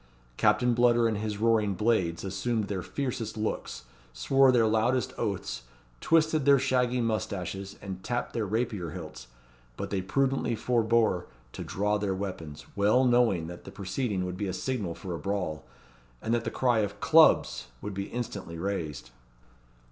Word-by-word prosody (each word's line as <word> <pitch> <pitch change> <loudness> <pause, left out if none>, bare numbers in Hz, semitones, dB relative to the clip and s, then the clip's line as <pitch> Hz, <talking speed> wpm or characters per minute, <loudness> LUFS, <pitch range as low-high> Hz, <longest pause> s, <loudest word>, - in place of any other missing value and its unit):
Captain 105 - +3
Bludder 120 -1 +4
and 110 -2 -1
his 105 -1 -3
roaring 110 -2 +2
blades 95 -6 +1
assumed 100 +4 -1
their 100 -2 -3
fiercest 120 -2 -4
looks, 105 - -3 0.3
swore 135 - +4
their 120 -3 +4
loudest 110 +4 +1
oaths, 95 - -3 0.4
twisted 155 - +3
their 140 0 +6
shaggy 125 -1 +1
moustaches, 100 -4 -3
and 95 -2 -6
tapped 120 0 -2
their 110 -3 -1
rapier 105 -5 -1
hilts; 65 -3 -8 0.5
but - - -5
they 100 -2 0
prudently 135 +4 0
forbore 115 -6 +1 0.3
to - - -6
draw 105 +1 0
their 100 -2 -1
weapons, 85 -6 -6
well 105 +6 +4
knowing 120 -9 +3
that 85 +1 -9
the - - -9
proceeding 95 0 -2
would 90 0 -5
be 100 - -2
a 95 - -2
signal 95 -3 -3
for 90 -3 -6
a 85 - -4
brawl, 90 -6 -3 0.5
and 115 - -2
that 120 0 0
the - - 0
cry 120 -3 +2
of 100 -1 -2
"Clubs!" - - +5
would 105 - -5
be 100 +1 -3
instantly 100 -8 -5
raised. 85 -8 -4
105 Hz, 160 wpm, -28 LUFS, 95-120 Hz, 0.5 s, their